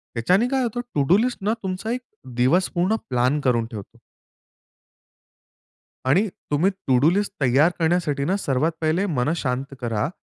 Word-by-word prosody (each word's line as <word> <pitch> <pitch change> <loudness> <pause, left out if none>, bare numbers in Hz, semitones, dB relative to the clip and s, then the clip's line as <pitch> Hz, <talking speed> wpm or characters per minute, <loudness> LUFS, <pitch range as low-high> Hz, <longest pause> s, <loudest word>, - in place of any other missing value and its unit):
याच्याने 185 - +2
काय 265 -1 +1
होतं 240 +1 -2
टू 140 - +3
डू 185 - +6
लिस्टनं 225 -3 0
तुमचा 190 +4 -3
एक 250 +1 -2 0.3
दिवस 145 +10 +2
पूर्ण 185 +6 +2
प्लॅन 125 +4 +1
करून 120 -4 +1
ठेवतो. 105 -3 -9 2.1
आणि 185 +11 +3 0.2
तुम्ही 160 +7 +3 0.2
टू 130 -1 +4
डू 150 +5 +5
लिस्ट 205 +2 0
तयार 135 +7 +4
करण्यासाठी 160 -4 +1
सर्वात 145 0 0
पहिले 160 +5 +1
मन 140 +6 +1
शांत 135 -1 -3
करा 115 +4 -1
160 Hz, 145 wpm, -23 LUFS, 130-195 Hz, 2.1 s, डू